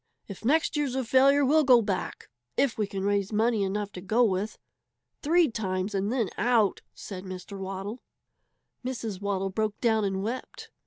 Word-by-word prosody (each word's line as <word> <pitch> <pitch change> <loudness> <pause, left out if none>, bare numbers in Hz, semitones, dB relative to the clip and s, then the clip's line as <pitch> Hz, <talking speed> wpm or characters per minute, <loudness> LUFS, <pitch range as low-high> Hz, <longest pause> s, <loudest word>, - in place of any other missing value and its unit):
If 200 0 -9
next 310 +8 +2
year's 285 -4 0
a 265 - 0
failure, 275 +4 +4
we'll 305 +3 +4
go 255 -3 +7
back 195 -3 -3 0.3
if 275 -4 +2
we 210 -2 -1
can 195 -1 -4
raise 200 0 0
money 220 0 +2
enough 205 +1 -2
to 180 - -8
go 215 +6 +2
with. 205 -1 0 0.6
Three 335 +2 +4
times 195 -4 -2
and 200 +2 0
then 235 -6 0
out!" 225 -2 +2
said 185 -2 -8
Mr. 185 +1 -8
Waddle. 195 +4 -5 0.8
Mrs. 230 -6 -4
Waddle 195 -1 -1
broke 215 +1 -2
down 220 -3 +2
and 195 -1 -1
wept. 240 +5 -6
215 Hz, 170 wpm, -27 LUFS, 195-245 Hz, 0.8 s, go